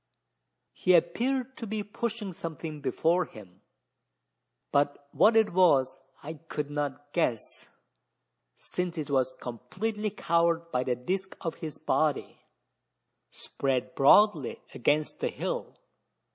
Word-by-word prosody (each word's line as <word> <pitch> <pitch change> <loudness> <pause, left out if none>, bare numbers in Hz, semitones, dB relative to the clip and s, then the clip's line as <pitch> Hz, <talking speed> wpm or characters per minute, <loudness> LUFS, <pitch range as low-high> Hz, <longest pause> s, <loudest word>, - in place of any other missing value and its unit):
He 185 - +3
appeared 250 +10 +1
to 230 - -6
be 215 0 -2
pushing 210 -1 -4
something 160 -2 -6
before 165 +6 +1
him; 95 -3 -14 1.1
but 145 0 +1
what 220 +2 +5
it 220 -4 +4
was, 145 -8 +4 0.3
I 155 +1 -7
could 145 -1 -3
not 145 0 -4
guess: 125 -10 -1 0.9
since 180 -2 -4
it 150 -2 -4
was 130 -2 +2
completely 210 - -3
covered 170 -2 +1
by 125 0 +1
the 125 - +1
disc 185 +10 -3
of 165 -3 -2
his 155 -2 -5
body 155 -2 0 0.9
spread 135 -2 -2
broadly 155 - +4
against 150 +5 0
the - - 0
hill. - - -4
160 Hz, 115 wpm, -29 LUFS, 140-190 Hz, 1.1 s, what